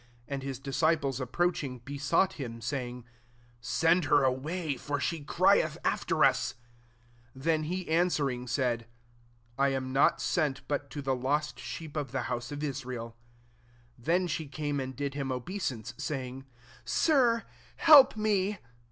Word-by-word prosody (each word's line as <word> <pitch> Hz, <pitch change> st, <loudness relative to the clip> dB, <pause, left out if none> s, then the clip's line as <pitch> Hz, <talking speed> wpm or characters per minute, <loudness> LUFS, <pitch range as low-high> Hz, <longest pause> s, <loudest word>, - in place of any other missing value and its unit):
And 140 Hz, -1 st, -3 dB
his 135 Hz, -1 st, -4 dB
disciples 140 Hz, 0 st, 0 dB
approaching, 140 Hz, 0 st, -1 dB
besought 145 Hz, +7 st, +1 dB
him, 115 Hz, -3 st, -5 dB
saying, 125 Hz, 0 st, -4 dB, 0.5 s
"Send 165 Hz, +8 st, +2 dB
her 145 Hz, 0 st, +4 dB
away, 145 Hz, +4 st, -1 dB
for 145 Hz, +3 st, -3 dB
she 160 Hz, +1 st, -2 dB
crieth -, -, +3 dB
after -, -, +2 dB
us.'' -, -, +1 dB, 0.8 s
24 130 Hz, -, -12 dB
Then 155 Hz, -1 st, +1 dB
he 180 Hz, +3 st, -3 dB
answering, 150 Hz, -7 st, +1 dB
said, 120 Hz, -3 st, 0 dB, 0.7 s
«*I 140 Hz, -, +4 dB
am 130 Hz, -1 st, -2 dB
not 135 Hz, -, +4 dB
sent 150 Hz, -6 st, -1 dB
but 145 Hz, -1 st, -2 dB
to 145 Hz, 0 st, -6 dB
the 135 Hz, -1 st, +1 dB
lost 145 Hz, +4 st, -1 dB
sheep 160 Hz, -2 st, -7 dB
of 145 Hz, -3 st, -3 dB
the 130 Hz, -2 st, -1 dB
house 120 Hz, +2 st, -4 dB
of 145 Hz, +1 st, -5 dB
Israel.*' 125 Hz, -5 st, -4 dB, 0.8 s
25 120 Hz, -, -20 dB
Then 180 Hz, +2 st, +3 dB
she 160 Hz, -2 st, -3 dB
came 145 Hz, 0 st, -3 dB
and 130 Hz, 0 st, -4 dB
did 140 Hz, +1 st, -3 dB
him 135 Hz, -2 st, -3 dB
obeisance, 125 Hz, -, -4 dB
saying, 135 Hz, -2 st, -4 dB, 0.4 s
"Sir, 230 Hz, -, +3 dB, 0.3 s
help 285 Hz, -8 st, +8 dB
me.'' 210 Hz, -1 st, +1 dB
140 Hz, 145 wpm, -30 LUFS, 130-160 Hz, 0.8 s, help